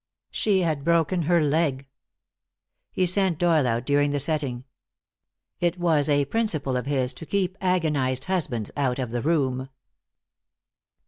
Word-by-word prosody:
She 200 -3 +1
had 155 -5 -1
broken 170 +2 +1
her 175 -1 +4
leg. 150 -3 0 1.1
He 185 - +1
sent 185 -2 +2
Doyle 165 -6 +2
out 115 +1 -1
during 145 +1 +2
the 145 0 -1
setting. 140 -4 0 1.0
It 175 0 0
was 160 -4 +1
a 145 -1 +2
principle 155 - -1
of 125 +1 -3
his 130 -3 +1
to 165 - -10
keep 190 -2 -1
agonized 150 -8 0
husbands 130 - -2
out 135 -4 0
of 125 -4 -4
the 120 0 -2
room. 135 -4 0
150 Hz, 140 wpm, -24 LUFS, 130-175 Hz, 1.1 s, her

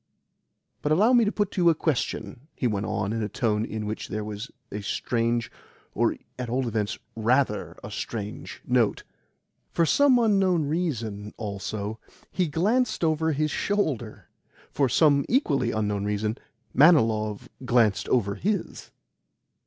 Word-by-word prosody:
"But 150 - -1
allow 210 +10 +4
me 240 -2 +5
to 205 - +1
put 205 -3 -1
to 185 - -2
you 170 - +6
a 165 - +3
question," 125 -5 -2
he - - -3
went 105 -3 0
on 100 +1 -1
in 115 - -2
a 105 - -2
tone 105 -1 0
in 110 -1 -4
which 110 +1 -4
there 105 0 -3
was 105 +3 -6 0.2
a 105 - -4
strange 115 +3 -1 0.4
or, - - +1 0.2
at 125 -2 -3
all 125 +1 0
events, 105 -2 -1 0.2
RATHER 115 0 +1
a 100 - -7
strange 105 0 -6
note. 125 -4 +1 0.7
For 170 - +2
some 280 - +5
unknown 195 -8 +3
reason, 115 - -3
also, 105 +1 -4 0.3
he 180 -2 0
glanced 210 - +1
over 160 0 +2
his 150 +1 0
shoulder. 145 - -2 0.4
For 135 -3 +1
some 145 +2 +4
equally 145 - +2
unknown 105 -2 -1
reason, 105 +3 -1 0.3
Manilov 110 -9 +4 0.2
glanced 120 -5 +2
over 105 -5 +2
HIS. 205 - -3
120 Hz, 145 wpm, -26 LUFS, 105-160 Hz, 0.7 s, you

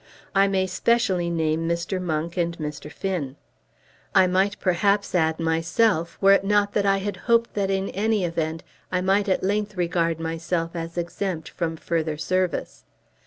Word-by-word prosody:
I 195 0 +4
may 190 -1 +1
specially 190 -2 +1
name 165 0 0
Mr. 170 +2 -1
Monk 165 -1 -2
and 170 -1 -1
Mr. 150 -1 -6
Finn. 165 -9 -3 0.8
I 190 - +7
might 190 +3 +1
perhaps 200 +2 +1
add 160 -2 +2
myself, 165 +2 +1
were 195 0 +6
it 195 - +3
not 205 0 +2
that 200 -1 +1
I 195 0 +4
had 200 +1 -3
hoped 230 0 +3
that 200 -2 -1
in 195 0 0
any 210 -1 0
event 165 -1 -2 0.3
I 180 0 +1
might 195 +2 +2
at 190 - +1
length 205 +1 -1
regard 170 -2 0
myself 165 +1 -2
as 165 +1 -5
exempt 175 -1 -3
from 165 -2 -3
further 160 -2 -2
service. 185 +3 -1
180 Hz, 165 wpm, -24 LUFS, 165-195 Hz, 0.8 s, I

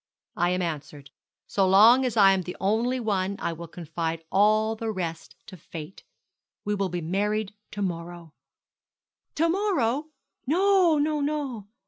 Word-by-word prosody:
'I 175 +1 +1
am 180 0 0
answered. 150 -3 -6 0.3
So 195 -2 +1
long 230 +7 +7
as 240 -3 -2
I 195 -2 +7
am 190 -1 +1
the 180 0 -7
only 230 +6 0
one 200 -4 -1
I 170 - -2
will 170 +1 -8
confide 165 0 -4
all 215 +2 +3
the 225 0 -4
rest 170 -5 -5
to 190 - -11
Fate. 160 +2 -10 0.6
We 210 - 0
will 195 -2 -1
be 175 0 -3
married 205 +4 -1 0.2
to 205 - -4
morrow.' 170 -2 -5 1.0
'To 330 +2 +2
morrow! 315 - 0 0.4
No, 365 0 +4
no, 300 +1 +1
no.' 280 -8 -3
200 Hz, 150 wpm, -26 LUFS, 175-245 Hz, 1.0 s, long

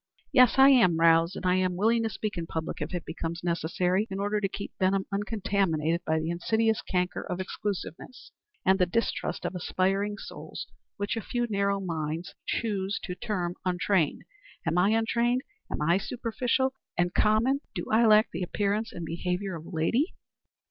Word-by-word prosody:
"Yes, 255 -2 +6
I 270 +1 +9
am 230 -11 +5
roused, 165 +2 +4
and - - -6
I 180 0 +3
am 185 -1 +1
willing 225 +5 +3
to 225 - 0
speak 215 -1 -4
in 170 -2 -4
public 160 0 -4
if - - -3
it 175 -2 -4
becomes 165 +1 -5
necessary 180 +4 0
in 195 - -4
order 205 +1 0
to 195 - 0
keep 200 - -7
Benham 190 +1 +2
uncontaminated 195 -6 0
by 160 - +2
the 160 +1 -2
insidious 220 +5 +1
canker 180 -1 -1
of 180 - -4
exclusiveness 200 +5 -5 0.3
and 190 +1 +4
the 180 - +4
distrust 230 +6 -1
of - - -2
aspiring 195 +3 0
souls - - -8 0.3
which 205 +2 -2
a 225 - -2
few 240 +3 -1
narrow 200 -2 +1
minds 165 -2 -3
choose 200 -3 -1
to 180 - -4
term 180 -3 -2
untrained. 180 -2 +1 0.4
Am 165 0 0
I 190 +3 +4
untrained? 235 +3 +1 0.3
Am - - -2
I 170 +4 +3
superficial 250 +4 -1 0.2
and 175 0 +1
common? 230 +6 +3
Do - - -3
I 225 +1 +5
lack 215 +1 +5
the - - -4
appearance 205 +4 -1
and 170 - -6
behavior 180 +3 -2
of 160 0 -9
a - - -9
lady?" 210 - 0
195 Hz, 175 wpm, -28 LUFS, 175-220 Hz, 0.4 s, I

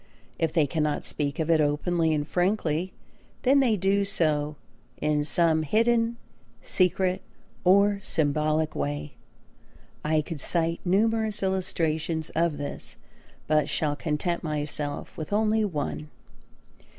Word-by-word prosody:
If 165 -1 +1
they 155 -3 +3
cannot 150 0 -1
speak 145 -2 -1
of 160 0 0
it 160 -1 +4
openly 160 +3 +1
and 150 -1 0
frankly 180 -2 0 0.5
then 270 +2 +5
they 240 -6 +3
do 195 +2 +2
so 155 -6 +1 0.4
in 150 0 0
some 160 +1 +3
hidden, 230 +7 +2 0.4
secret, 185 0 +1 0.4
or 200 +2 +4
symbolic 155 -1 0
way. 75 +1 -3 0.9
I 155 0 +2
could 160 0 -6
cite 165 +3 0
numerous 215 +2 +1
illustrations 165 -4 -1
of 165 -3 0
this 145 0 -7 0.5
but 155 -1 +2
shall 150 -2 0
content 160 +4 -2
myself 150 -1 -2
with 155 +2 -6
only 215 +1 +2
one. 75 - -3
160 Hz, 120 wpm, -26 LUFS, 150-190 Hz, 0.9 s, then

